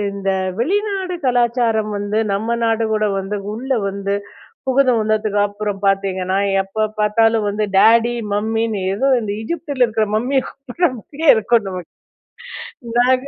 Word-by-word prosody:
இந்த 195 -1 -2 0.3
வெளிநாடு 385 - -1
கலாச்சாரம் 235 -3 +1
வந்து 205 +2 -1
நம்ம 225 +4 -1
நாடு 225 0 +1
கூட 215 0 +1
வந்து 195 +2 -3 0.2
உள்ளே 260 +4 -2
வந்து 200 0 -3 0.5
புகுந்து 260 -1 +3
வந்ததுக்கு 215 -1 0
அப்புறம் 205 -1 -4
பார்த்திங்கணா, 190 -1 0 0.2
எப்போ 195 +3 -3 0.2
பார்த்தாலும் 220 +1 +2
வந்து 210 +1 -1
டாடி 230 +3 +5 0.2
மம்மின்னு 220 +1 -1
ஏதோ 260 +7 0
இந்த 210 -2 -3
எஜிப்தில 285 0 0
இருக்கற 220 -1 0
மம்மிய 255 +5 +1
கூப்பிடுற 275 +6 -1
மாதிரியே 295 +7 -2
இருக்கும் 220 -1 +1
நமக்கு. 180 -2 -7 1.1
நாக 255 +1 +4
220 Hz, 130 wpm, -19 LUFS, 205-245 Hz, 1.1 s, டாடி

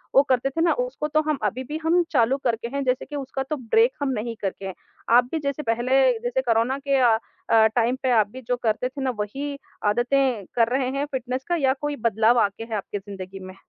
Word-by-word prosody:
वो 275 - +9
करते 255 +1 +2
थे 325 +4 -2
ना, 340 - +4
उसको - - -3
तो 310 +1 +2
हम 300 - +1
अभी-भी 255 +8 -2
हम 340 +2 +4
चालू 255 0 +3
करके 235 -2 -1
हैं। 280 - 0
जैसे 255 +1 0
कि 295 - -8
उसका 270 -1 -3
तो 305 - 0
ब्रेक 450 - +3
हम 280 - 0
नहीं 230 +1 -4
करके 195 0 -4
हैं। 190 - -4 0.4
आप 245 0 +5
भी 325 - -1
जैसे 280 +1 -2
पहले 245 +3 +2 0.2
जैसे 245 +2 -1
कोरोना 240 +1 +1
के 275 -1 +3
अ 235 -3 +5 0.3
अ, 225 -1 +6
टाइम 240 +1 +2
पे 255 - +2
आप 215 -2 +4
भी 260 - -9
जो 250 - +1
करते 230 +3 0
थे 275 +1 -7
ना 260 - +1
वही 280 +7 -4 0.3
आदतें 240 0 +1
कर 230 -2 +4
रहे 260 -2 0
हैं 285 - 0
फ़िटनेस 255 0 -3
का? 350 - +1
या 270 -5 +2
कोई 295 0 -2
बदलाव 225 +2 +3
आके 205 0 0
हैं 225 -1 -5
आपकी 205 +1 -5
ज़िंदगी 195 -1 -9
में? 185 0 -10
250 Hz, 230 wpm, -24 LUFS, 225-275 Hz, 0.4 s, वो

